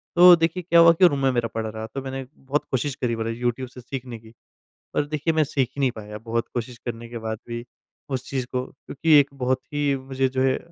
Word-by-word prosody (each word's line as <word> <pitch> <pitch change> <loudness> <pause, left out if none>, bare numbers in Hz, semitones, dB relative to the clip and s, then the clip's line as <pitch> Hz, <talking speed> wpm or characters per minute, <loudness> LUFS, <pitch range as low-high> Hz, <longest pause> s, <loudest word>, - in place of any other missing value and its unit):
तो 175 0 +10
देखिए, 170 +2 0
क्या 170 0 +4
हुआ 170 0 +9
कि 180 +2 +6
रूम 145 -5 -1
में 135 - +4
मेरा 120 -2 0
पड़ 110 0 -2
रहा, 110 0 -5
तो 135 +5 -6
मैंने 135 0 -5
बहुत 140 +3 -2
कोशिश 135 +2 -1
करी 120 -3 -1
मतलब 115 0 -2
यूट्यूब 120 +1 -2
से 125 0 -12
सीखने 125 -2 -7
की। 110 0 -17 0.6
पर 145 - +1
देखिए, 155 +2 -1
मैं 155 -1 +3
सीख 135 -3 0
ही - - -7
नहीं 135 -2 +2
पाया, 105 -2 -8
बहुत 115 +2 -2
कोशिश 120 0 -4
करने 115 -1 -5
के 120 - -6
बाद 110 0 -2
भी 120 0 -5 0.4
उस 130 -3 -4
चीज़ 130 -2 -2
को, 125 0 0
क्योंकि 150 +4 -1
एक 140 0 +2
बहुत 130 -1 0
ही 145 -1 +1
मुझे 130 0 -1
जो 130 0 -1
है 130 0 +2
130 Hz, 240 wpm, -24 LUFS, 120-145 Hz, 0.6 s, तो